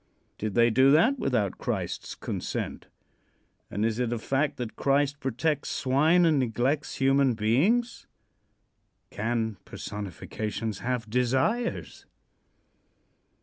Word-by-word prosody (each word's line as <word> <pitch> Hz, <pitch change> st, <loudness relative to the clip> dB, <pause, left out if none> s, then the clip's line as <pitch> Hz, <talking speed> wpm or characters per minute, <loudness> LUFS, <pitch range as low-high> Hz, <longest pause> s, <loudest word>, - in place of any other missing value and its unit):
Did 110 Hz, -2 st, -3 dB
they 120 Hz, 0 st, +5 dB
do 130 Hz, +4 st, +5 dB
that 245 Hz, -, +4 dB
without 105 Hz, -8 st, 0 dB
Christ's -, -, -3 dB
consent, -, -, -4 dB, 0.8 s
and 105 Hz, +3 st, -1 dB
is 115 Hz, +1 st, -1 dB
it 125 Hz, -2 st, 0 dB
a 120 Hz, -, -1 dB
fact 135 Hz, +6 st, -1 dB
that 120 Hz, -3 st, -5 dB
Christ 140 Hz, 0 st, +1 dB
protects 135 Hz, +3 st, -1 dB
swine 155 Hz, +7 st, +3 dB
and 155 Hz, -4 st, +3 dB
neglects 130 Hz, +4 st, 0 dB
human 135 Hz, -2 st, +3 dB
beings? 155 Hz, -, +1 dB, 1.0 s
Can 110 Hz, -1 st, -2 dB
personifications 105 Hz, +1 st, -5 dB
have 125 Hz, -2 st, -2 dB
desires? 130 Hz, -, -1 dB
130 Hz, 105 wpm, -27 LUFS, 115-145 Hz, 1.0 s, they